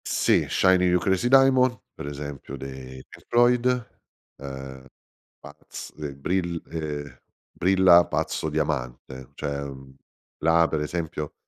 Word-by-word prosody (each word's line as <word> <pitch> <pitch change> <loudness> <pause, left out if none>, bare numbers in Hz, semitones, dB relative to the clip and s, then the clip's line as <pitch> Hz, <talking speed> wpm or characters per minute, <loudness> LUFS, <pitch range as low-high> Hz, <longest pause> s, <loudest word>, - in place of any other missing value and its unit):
Sì, - - +2
Shining 90 -1 +3
You 90 0 +3
Crazy 95 +5 +1
Diamond, 130 -1 +5
per - - -8
esempio 70 -1 -7
dei 65 -1 -9
Pink - - -16
Floyd, 120 0 +3 0.5
ehm, 65 -1 -8 0.6
pazz 70 +2 -10
de 75 -2 -7
brill 85 +3 -2
ehm, 75 -3 -5 0.3
Brilla 95 -2 +5
Pazzo 80 - -2
Diamante, 65 -4 -4
cioè, 70 -1 -4
mhmm, 65 -1 -10 0.5
là 80 +1 +4
per 80 - -1
esempio 75 -1 -4
75 Hz, 120 wpm, -25 LUFS, 70-95 Hz, 0.6 s, Diamond